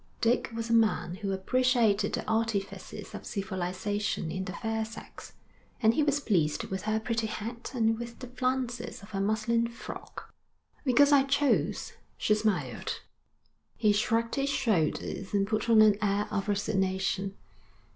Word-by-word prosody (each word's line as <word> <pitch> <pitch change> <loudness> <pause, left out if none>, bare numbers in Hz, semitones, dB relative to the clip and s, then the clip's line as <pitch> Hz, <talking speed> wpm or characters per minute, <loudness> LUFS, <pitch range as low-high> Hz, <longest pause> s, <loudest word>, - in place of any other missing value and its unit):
Dick 235 +1 +2
was 230 0 -4
a - - +4
man 220 -6 +3
who 200 -1 -3
appreciated 230 +1 +2
the - - -3
artifices 220 -2 -2
of - - -7
civilisation 190 -1 -2
in 190 +2 -3
the 185 - -5
fair 225 -1 -2
sex, 220 +1 -10 0.5
and 220 -1 +4
he 305 - +2
was 290 -1 +2
pleased 170 - +1
with 190 0 -4
her 215 0 +2
pretty 230 0 -1
hat 230 +3 -5
and 225 -1 +2
with 235 0 -7
the 255 - -7
flounces 255 -3 -2
of 200 - -12
her 195 -1 -1
muslin 220 +3 +1
frock. 235 0 -9 0.5
'Because 285 +2 +5
I 285 -1 +7
chose,' 280 +1 +1 0.2
she 215 - +2
smiled. 215 -3 -1 0.8
He 215 -2 +4
shrugged 225 +2 +1
his 275 0 0
shoulders 200 - 0
and 200 -1 +3
put 215 +2 -1
on 220 -1 +8
an 210 -1 +5
air 205 0 +1
of 195 - -1
resignation. 195 -1 0
220 Hz, 155 wpm, -29 LUFS, 200-235 Hz, 0.8 s, on